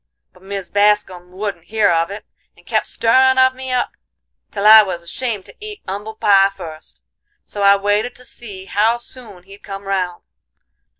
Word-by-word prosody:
But - - -21
Mis 195 -1 -6
Bascum 205 -3 +1
wouldn't 185 -3 -5
hear 220 -3 +2
of 165 0 +1
it, 205 +1 -8 0.3
and - - -22
kep' - - -1
stirrin' 260 +3 +3
of 260 0 +5
me 260 0 -7
up 250 -1 0 0.6
till 200 -1 -4
I 220 +1 +10
was 180 -4 -4
ashamed 210 +2 -4
to - - -15
eat 425 0 -9
'umble 205 +3 -6
pie 195 -2 +4
fust; 165 -5 -11 0.4
so 205 - -7
I 200 0 +6
waited 205 +4 -1
to 250 - -14
see 200 -6 -8
how 220 +4 +1
soon 235 -6 -12
he'd 195 +2 -15
come 195 0 -8
round. 185 -3 -3
205 Hz, 175 wpm, -18 LUFS, 190-225 Hz, 0.6 s, I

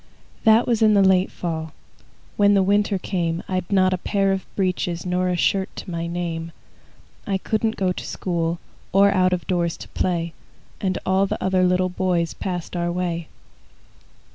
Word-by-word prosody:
That 220 +2 +6
was 235 -2 +1
in 215 -1 +5
the 200 - +5
late 190 0 +3
fall. 160 -2 -4 0.6
When 205 0 +4
the 195 - +4
winter 205 +1 +2
came, 170 -2 -2
I'd 185 -1 -3
not 185 -1 +4
a 185 - -2
pair 195 +1 +1
of 190 -1 -2
breeches 180 -3 -1
Nor 180 0 0
a 180 - +1
shirt 190 +2 +1
to - - -7
my 170 0 -3
name. 170 -1 -4 0.7
I 195 -1 +1
couldn't 220 +3 -1
go 185 -2 0
to - - -5
school, 170 -2 -2 0.4
Or 200 +1 +6
out 185 -1 +3
of 180 -1 -1
doors 175 -3 0
to - - -10
play. 170 -2 -1 0.5
And 185 -2 0
all 190 +1 +2
the - - -2
other 190 -1 +2
little 185 0 +2
boys 180 -2 0
Passed 180 -2 -5
our 175 0 -1
way. 170 -2 -2
185 Hz, 175 wpm, -23 LUFS, 175-195 Hz, 0.7 s, That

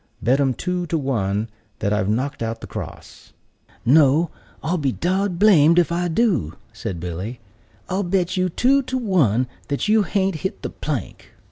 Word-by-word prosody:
Bet 130 +4 +2
'em 135 -3 +2
two 180 -1 -2
to 165 - 0
one 110 -7 -1 0.3
that 100 - 0
I've 105 -1 0
knocked 130 +6 -1
out 115 0 -3
the - - -8
cross." - - -9 0.5
"No, 150 +4 +4 0.3
I'll 170 +3 0
be 140 -3 +1
dod 185 +4 -1
blamed 170 -5 +6
if 175 -1 +3
I 175 +1 0
do," 170 - +1 0.2
said 90 -3 -5
Billy; 90 +8 -5 0.5
"but - - -5
I'll 190 - +1
bet 180 -1 0
you 185 0 +1
two 265 +10 +3
to 260 0 -3
one 155 - +2 0.2
that 140 +6 -1
you 215 +1 +4
hain't 195 -3 0
hit 190 +6 -5
the - - -3
plank." - - -5
160 Hz, 175 wpm, -22 LUFS, 120-185 Hz, 0.5 s, blamed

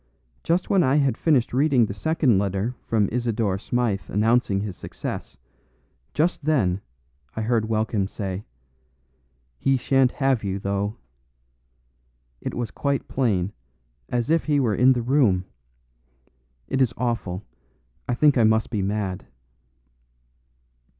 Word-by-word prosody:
Just 175 +2 +1
when 195 -2 +3
I 135 -3 +3
had 140 -5 +2
finished 135 -5 +2
reading 135 -3 +4
the 100 - -5
second 130 -1 +2
letter 100 +4 -1
from 105 -3 +1
Isidore 115 -5 0
Smythe 115 -4 0
announcing 105 -1 +2
his 100 -3 -4
success. - - -6 0.8
Just 155 0 +1
then, 100 -12 +1 0.5
I 110 - -2
heard 110 -1 +1
Welkin 110 -2 0
say, 95 -1 -5 1.2
'He 135 -1 +2
shan't 130 0 +2
have 135 -5 +1
you, 95 -1 -2
though.' 100 +2 -2 1.5
It - - -4
was 120 -3 -3
quite 140 -1 -1
plain, 105 -7 0 0.6
as 120 +3 -1
if 165 - +2
he 150 -2 +2
were 120 -6 +1
in 125 +5 +5
the 120 -2 -2
room. 115 -9 +2 1.2
It 135 - 0
is 120 -3 +2
awful, 115 -6 -2 0.6
I 120 - +1
think 145 0 +4
I - - +5
must 110 +1 +2
be 105 -4 -1
mad." 95 -1 -2
115 Hz, 130 wpm, -24 LUFS, 100-135 Hz, 1.5 s, in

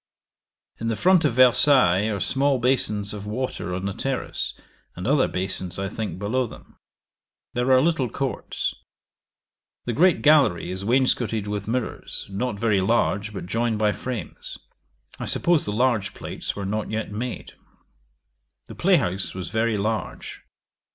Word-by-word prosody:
In 115 - -3
the 115 - 0
front 180 - +4
of 140 - +2
Versailles 125 -5 +5
are 100 -2 -2
small 135 +8 +2
basons 110 -5 0
of 105 0 -7
water 115 -4 -3
on 95 +1 -4
the 100 - -2
terrace, 135 +6 -3 0.4
and 90 - -6
other 135 +2 +3
basons, 95 -1 -4
I 95 0 -2
think, 110 -1 -4
below 115 +6 0
them. - - -15 0.7
There 125 +2 +1
are 130 0 +6
little 155 -7 +1
courts. 135 +3 -3 1.1
The 120 - -1
great 175 +6 +3
gallery 145 - +4
is 95 +1 -4
wainscotted 115 -2 +1
with 105 -1 -4
mirrors, 125 +1 -3
not 105 +2 -2
very 105 -3 +2
large, 105 0 +1
but 100 - -6
joined 115 +3 0
by 105 -1 +2
frames. 125 +2 -6 0.6
I - - -3
suppose 170 -3 +2
the 105 - 0
large 115 -2 +1
plates - - -5
were 100 - -4
not 105 +2 -2
yet 110 -1 -3
made. 120 +4 -5 1.1
The - - -10
play - - +3
house 95 +2 -2
was 95 -1 -5
very 110 -1 +1
large. 110 +2 -3
110 Hz, 150 wpm, -24 LUFS, 100-130 Hz, 1.1 s, are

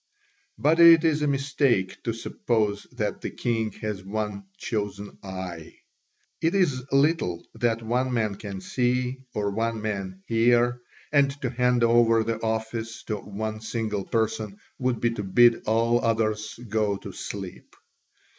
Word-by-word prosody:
But 155 +3 +3
it 165 -1 +9
is 155 -2 +2
a 150 - +2
mistake 135 -8 +1
to 115 - +1
suppose 110 -2 -1
that - - -2
the - - -3
king 115 -2 -1
has 105 -3 -3
one 105 0 -4
chosen 105 -2 -4
"eye." 95 -4 -7 0.7
It 165 +4 +2
is 140 -9 +1
little 135 - +2
that 115 -2 0
one 125 +3 0
man 110 -4 0
can 100 -1 -7
see 125 +4 -1
or 100 -1 0
one 115 +2 -1
man 95 -3 -4
hear, 120 +1 +3 0.3
and 140 -2 +4
to 125 - 0
hand 125 -1 +2
over 115 -1 +5
the 115 0 -2
office 110 0 -3
to 110 - -3
one 110 +2 -5
single 110 -2 -2
person 110 -2 -1 0.2
would 125 -2 0
be 120 - +1
to 115 - -4
bid 115 +4 +4
all 115 +2 +2
others 110 -1 0
go 105 -1 0
to - - -9
sleep. 95 -3 -8
115 Hz, 145 wpm, -26 LUFS, 105-125 Hz, 0.7 s, it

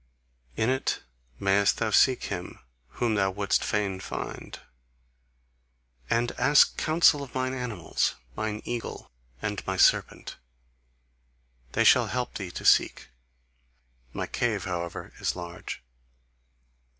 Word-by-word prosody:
In 110 +3 +2
it 130 - -1 0.4
mayest 100 +1 +3
thou 110 -1 -1
seek 130 +4 +4
him 90 -3 -5 0.4
whom 115 - 0
thou 95 -2 +2
wouldst 100 +1 0
fain 100 -3 -1
find. - - -6 1.5
And 120 +1 +1
ask 145 +1 +5
counsel 155 -2 +4
of 135 -3 -9
mine 130 0 -1
animals, 115 -10 -1 0.2
mine 110 0 -3
eagle 120 -1 -5 0.3
and 105 -1 -3
my 95 0 -1
serpent: - - +2 1.4
they - - +3
shall - - +6
help 125 0 -3
thee 95 -3 -5
to - - -8
seek. - - +3 1.0
My - - -3
cave 110 -6 -1
however 85 -2 -5
is - - -1
large. 85 -5 -7
105 Hz, 115 wpm, -27 LUFS, 95-125 Hz, 1.5 s, shall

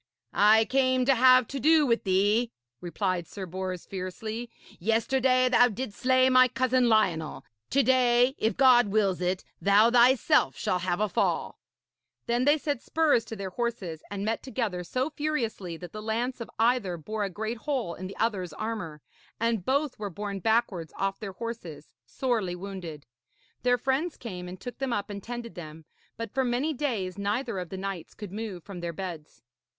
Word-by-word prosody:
'I 220 +2 +5
came 255 0 +2
to 275 - +5
have 255 -1 +6
to 275 - -4
do 310 +3 +5
with 230 -4 +1
thee,' 205 +5 +2 0.3
replied 175 0 -2
Sir 195 - -7
Bors 185 0 -5
fiercely. 215 +5 -5 0.3
'Yesterday 255 +5 +2
thou 245 0 +6
didst 230 -1 -6
slay 255 0 +4
my 255 0 +6
cousin 255 -1 +2
Lionel. 180 -8 +1 0.2
To 275 +1 +3
day, 250 0 +4
if 220 - 0
God 250 -4 +6
wills 195 -3 +1
it, 180 +1 -1 0.2
thou 205 +4 +5
thyself 240 - +4
shall 180 - 0
have 180 0 -1
a 215 - +2
fall.' - - -1 0.7
Then 240 +2 +1
they 290 +2 +5
set 290 -4 -2
spurs 310 -7 +2
to 225 - -7
their 195 -2 -5
horses 195 -8 -3
and 200 0 -4
met 225 +1 -1
together 225 -9 -3
so 255 - -2
furiously 235 - -3
that 175 0 -9
the 215 - -7
lance 235 +4 -2
of 230 - -6
either 225 -6 +2
bore 210 +6 -4
a 200 - -1
great 220 +5 -4
hole 255 -10 -2
in 185 +2 -7
the 195 - -10
other's 190 -7 -1
armour, 180 -6 -5 0.4
and 230 -3 0
both 280 -1 0
were 205 -1 -3
borne 200 +2 -5
backwards 210 -5 0
off 195 0 -1
their 200 -3 -6
horses, 190 -9 -7 0.2
sorely 225 -9 -1
wounded. 180 -6 -7 0.6
Their 245 0 +3
friends 270 +7 -1
came 180 -6 -7
and 180 +1 -8
took 245 +5 -8
them 265 -3 -1
up 205 -1 -3
and 200 0 -6
tended 240 +1 -6
them, 160 -2 -10 0.3
but 230 -2 -6
for 265 0 +1
many 255 +5 0
days 220 -10 -2
neither 210 +1 -1
of 180 -2 -6
the 190 - -6
knights 190 -3 -5
could 205 -4 -8
move 205 -4 -6
from 195 -3 -8
their 170 -1 -4
beds. 165 -7 -7
220 Hz, 180 wpm, -28 LUFS, 185-250 Hz, 0.7 s, have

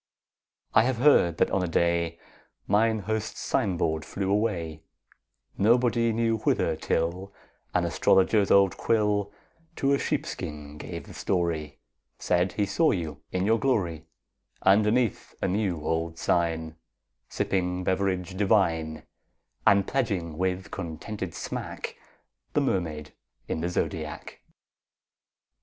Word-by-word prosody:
I - - +7
have 125 +1 0
heard 125 - +4
that - - +2
on 95 - +1
a 90 - -1
day 85 0 +1 0.5
Mine 110 +2 +2
host's 110 +2 -3
sign 100 -9 0
board 80 -1 0
flew 95 -1 -3
away, 90 -7 -1 0.8
Nobody 115 +1 +3
knew 115 0 +1
whither, - - +1
till 90 +4 -1 0.4
An - - +3
astrologer's 100 +2 +3
old 100 -1 +5
quill 105 -2 +1 0.4
To 140 0 +2
a 140 - +2
sheepskin 75 - -4
gave - - -7
the - - -12
story, 80 -6 -1 0.4
Said 90 0 +1
he 105 +2 +1
saw 155 +12 +2
you 80 -6 -2
in 95 +1 0
your 110 +2 +3
glory, 85 - 0 0.6
Underneath 105 +4 +2
a - - 0
new 90 -6 -1
old 80 0 -1
sign 80 -2 0 0.5
Sipping 90 -1 -1
beverage 95 -1 -1
divine, 85 -6 +1
20 - - -37 0.6
And 100 -1 +5
pledging 100 - -1
with 95 +2 -2
contented 90 +2 -5
smack - - -5 0.6
The - - +3
Mermaid 75 -5 -2 0.3
in 80 - -2
the 85 - -1
Zodiac. 80 -3 -4
95 Hz, 125 wpm, -27 LUFS, 85-105 Hz, 0.8 s, I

